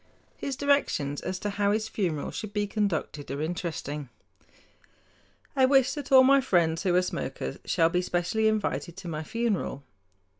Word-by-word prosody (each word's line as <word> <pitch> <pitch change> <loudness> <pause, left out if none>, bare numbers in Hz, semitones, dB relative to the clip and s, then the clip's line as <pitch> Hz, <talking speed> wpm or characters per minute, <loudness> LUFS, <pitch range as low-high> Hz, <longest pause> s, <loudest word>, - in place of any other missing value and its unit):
His 275 - -4
directions 280 - +1
as 185 - -3
to 205 +2 -3
how 200 0 +1
his 215 +1 0
funeral 175 -9 -2
should 215 -2 -6
be 205 -1 0
conducted 195 -8 -2
are 140 - -3
interesting: 155 -4 -4 1.5
"I 265 -1 +5
wish 270 -1 +4
that 290 -3 -6
all 260 -1 +9
my 275 +1 +6
friends 170 -9 +2
who 185 -3 +1
are 180 - +4
smokers 65 - -4
shall 165 -2 +3
be 180 +1 +1
specially 180 +5 0
invited 205 -5 -1
to 190 -2 -8
my 155 -2 -3
funeral. 205 - -2
190 Hz, 160 wpm, -27 LUFS, 165-220 Hz, 1.5 s, all